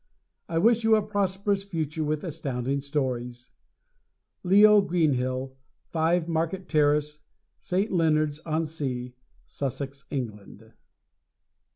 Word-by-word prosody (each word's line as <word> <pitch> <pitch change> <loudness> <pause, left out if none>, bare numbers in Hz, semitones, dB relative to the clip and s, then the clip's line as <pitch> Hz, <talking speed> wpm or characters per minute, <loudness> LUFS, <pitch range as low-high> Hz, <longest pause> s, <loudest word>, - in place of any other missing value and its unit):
I 165 - -1
wish 230 +6 +4
you 225 0 +5
a 215 - +3
prosperous 200 -1 0
future 160 -5 -3
with 150 0 -2
Astounding 140 -5 -3
Stories! 125 -4 -3 0.9
Leo 205 +3 +6
Greenhill, 130 -7 0 0.3
5 165 +1 +1
Market 170 +3 -2
Terrace, 150 0 +2 0.4
St. 195 +4 -1
Leonards 155 -4 +2
on 160 0 -1
Sea, 130 -6 -4 0.3
Sussex, 140 0 -5
England. 110 -4 -6
155 Hz, 100 wpm, -26 LUFS, 135-180 Hz, 0.9 s, Leo